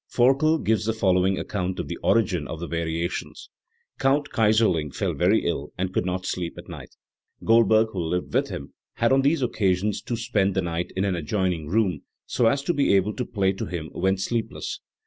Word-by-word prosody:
Forkel 135 +6 +4
gives 110 -7 0
the 110 - +1
following 95 -3 +2
account 95 -2 -3
of - - -3
the - - -5
origin - - +1
of 80 - -6
the 85 - -4
variations: 85 +1 -4 0.5
"Count 140 +2 +2
Kayserling 105 - +2
fell - - -1
very 95 +6 +2
ill 75 -4 -2
and 95 0 -2
could 90 - 0
not 90 0 -2
sleep 85 -2 -3
at - - -10
night, - - -10 0.5
Goldberg, 110 -1 +4
who 95 - -4
lived 90 +2 -2
with - - +1
him, - - -7 0.2
had 115 +1 +2
on 135 0 +5
these 140 +1 +2
occasions 100 -3 0
to 120 - -3
spend 105 -5 0
the 95 - +1
night 85 0 -3
in 95 +1 0
an 95 -2 0
adjoining 85 -1 -1
room, 95 -4 +1 0.2
so 120 - +1
as 140 +4 +1
to 175 - 0
be 140 -9 +3
able 100 +2 +2
to 125 - -3
play 95 -3 +1
to 95 - -5
him 85 -3 -5
when 95 +1 0
sleepless. 110 +4 -3
95 Hz, 200 wpm, -25 LUFS, 90-115 Hz, 0.5 s, on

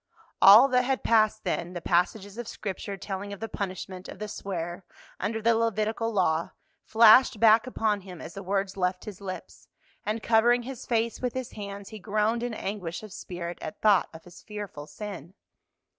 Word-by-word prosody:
All 215 +7 +10
that 250 -1 +4
had 260 +1 -1
passed 215 -1 +3
then, 175 -1 -2
the 175 - -4
passages 195 +5 0
of 240 - -5
Scripture 195 0 -5
telling 195 +1 -5
of 200 - -7
the 225 - -4
punishment 190 -2 -6
of - - -9
the 210 - -5
swearer 175 -3 -5 0.4
under 220 +2 -2
the 230 +1 +5
Levitical 225 0 0
law, 170 -5 +1 0.3
flashed 225 +1 +6
back 225 +1 +6
upon 215 -4 0
him 180 -3 -10
as - - -9
the 195 - -7
words 195 0 -1
left 180 -1 -1
his 205 -2 -9
lips, 185 -2 -8 0.4
and 215 +1 -3
covering 240 +2 +4
his 260 0 -8
face 230 -1 0
with 250 -1 -2
his 260 -2 -4
hands 200 -1 -7
he 215 - -9
groaned 215 +3 0
in 240 -2 -3
anguish 195 -4 -5
of 215 -3 -10
spirit 175 -1 -6
at 210 - -7
thought 205 -4 +4
of 160 0 -12
his 175 -1 -14
fearful 205 -9 -8
sin. 195 -3 -8
205 Hz, 185 wpm, -27 LUFS, 185-225 Hz, 0.4 s, All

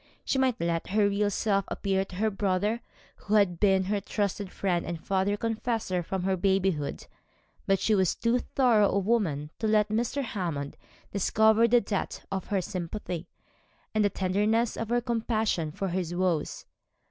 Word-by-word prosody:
She 265 - +1
might 260 -3 +1
let 170 0 -1
her 205 +1 +3
real 205 +1 +1
self 200 -1 +1
appear 195 -1 0
to 185 - -11
her 215 +3 +1
brother, 205 +3 0 0.4
who 215 - -1
had 185 -5 +3
been 190 -2 +4
her 200 +2 -1
trusted 200 -1 -2
friend 180 -3 0
and 170 -1 -4
father 195 +4 0
confessor 225 -4 -1
from 185 +2 -3
her 190 0 +1
babyhood; 190 -5 0 0.6
but 195 - +4
she 220 - +2
was 190 -4 +2
too 230 +2 +1
thorough 235 -6 +3
a - - 0
woman 185 -9 0
to 220 - 0
let 215 -1 +3
Mr. 235 +6 -1
Hammond 170 - -3 0.4
discover 220 +3 +4
the 240 +1 +4
depth 200 -4 -3
of 190 -2 -3
her 200 -3 0
sympathy, 180 -1 -5 0.7
the 210 -2 +3
tenderness 210 +5 +1
of 225 - -4
her 240 0 +2
compassion 225 -8 -1
for 195 +5 -3
his 175 -1 -2
woes. 175 -4 -1
200 Hz, 165 wpm, -28 LUFS, 185-220 Hz, 0.7 s, been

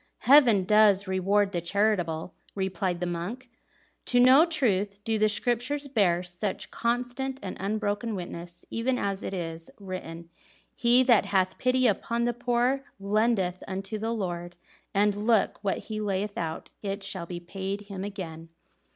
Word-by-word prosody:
"Heaven 245 -6 +6
does 205 0 +4
reward 195 +2 +2
the 175 - -2
charitable!" 175 -3 0 0.2
replied 190 -2 -2
the - - 0
monk. 190 +9 -5 0.5
"To 245 - +2
no 260 +7 +7
truth 205 - 0
do 220 0 0
the 215 0 +4
Scriptures 245 +7 0
bear 190 -9 +2
such 180 +3 -4
constant 245 +3 -2
and 190 - -5
unbroken 210 +2 -2
witness; 175 -1 -8
even 250 +3 0
as 200 -3 -2
it - - -4
is 165 -3 -5
written: 170 -3 -7 0.4
'He 245 +1 +4
that 240 -5 +4
hath 185 -2 +1
pity 255 0 +2
upon 235 +2 +1
the 240 0 +1
poor 245 +3 0 0.2
lendeth 200 -2 +1
unto 195 +3 -4
the 225 +2 -2
Lord; 175 -5 -4 0.4
and 205 +1 +2
look, 225 -3 +2
what 195 - 0
he 215 -1 -5
layeth 200 0 -2
out 160 -1 -4
it 200 -1 -4
shall 180 -3 -3
be 175 -1 -5
paid 195 +3 -5
him 200 -2 -7
again.'" 165 -5 -7
205 Hz, 150 wpm, -27 LUFS, 185-235 Hz, 0.5 s, no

